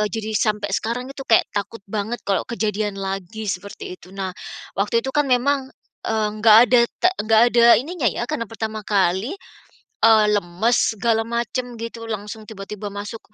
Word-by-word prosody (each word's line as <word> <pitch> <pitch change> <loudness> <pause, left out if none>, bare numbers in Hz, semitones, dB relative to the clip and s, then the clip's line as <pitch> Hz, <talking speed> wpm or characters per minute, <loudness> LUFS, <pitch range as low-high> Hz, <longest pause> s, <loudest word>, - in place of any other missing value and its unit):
eee, 210 - +1
jadi 220 +2 -4
sampai 210 -2 0
sekarang 235 +4 -2
itu 275 - -11
kayak 225 - +5
takut 205 +1 -4
banget 215 +3 -3
kalau 195 - +1
kejadian 210 -3 -2
lagi 195 +3 -5
seperti 195 -1 -5
itu. 180 - -16
Nah 190 -1 -3 0.5
waktu 210 +4 +2
itu 265 - -3
kan 295 - +3
memang, 265 +2 +2 0.4
eee, 220 -1 +1
nggak 215 0 +7
ada 250 -1 +6 0.2
te 365 - +6 0.2
nggak 220 0 +5
ada 235 -1 +5 0.2
ini 295 +7 -7
nya 260 - +1
ya - - -4
karena 305 -6 -2
pertama 220 -1 -4
kali, 195 - +1 0.7
eee, 220 -1 +7
lemes 205 +5 +1
segala 225 +1 +1
macam 235 +1 -3
gitu 230 0 -6
langsung 215 +1 -5
tiba-tiba 205 0 -7
masuk 205 +3 -6
220 Hz, 170 wpm, -22 LUFS, 205-235 Hz, 0.7 s, nggak